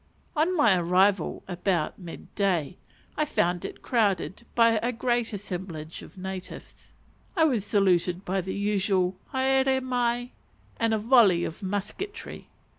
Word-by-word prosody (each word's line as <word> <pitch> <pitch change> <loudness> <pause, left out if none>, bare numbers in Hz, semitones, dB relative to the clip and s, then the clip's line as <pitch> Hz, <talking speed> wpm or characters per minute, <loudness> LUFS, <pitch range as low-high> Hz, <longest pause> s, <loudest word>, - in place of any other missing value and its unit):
On 335 +4 +2
my 225 -11 +5
arrival 180 +1 +2
about 180 -2 -1
mid 175 -3 -10
day, 185 -5 0 0.4
I 305 - +1
found 175 - 0
it - - -7
crowded 200 - 0
by 230 -2 +5
a 240 +3 -1
great 240 0 0
assemblage 180 -6 -6
of - - -14
natives. 190 0 -8 0.4
I 330 - +4
was 255 -10 +2
saluted 185 -3 +2
by 190 +1 0
the 190 +1 -5
usual 195 -2 +1 0.2
haere 265 0 +2
mai! 245 -1 -1 0.5
and 225 -1 +2
a - - +1
volley 215 -6 +5
of 165 - -5
musketry. 210 - -5
200 Hz, 135 wpm, -27 LUFS, 185-240 Hz, 0.5 s, my